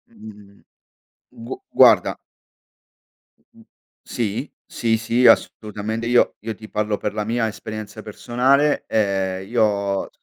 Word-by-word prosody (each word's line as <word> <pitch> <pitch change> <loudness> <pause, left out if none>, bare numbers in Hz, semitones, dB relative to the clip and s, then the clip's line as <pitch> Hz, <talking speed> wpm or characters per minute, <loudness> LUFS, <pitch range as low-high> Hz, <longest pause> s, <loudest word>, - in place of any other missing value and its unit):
Mhmm, 105 - -14 0.9
gu - - -4 0.2
guarda - - +6 1.3
Mhmm, - - -22 0.4
sì, 115 +4 -3 0.2
sì, 115 -1 0
sì 115 +3 0
assolutamente 110 0 +1
io 120 0 +3
io 110 0 -6
ti 110 +1 -12
parlo 105 -1 -1
per 105 - -4
la 105 0 -2
mia 115 +1 -1
esperienza 110 0 -7
personale, 130 +7 +1
ehm, 95 -3 -1
io 120 0 +2
ho 100 -2 -1
110 Hz, 115 wpm, -21 LUFS, 105-115 Hz, 1.3 s, guarda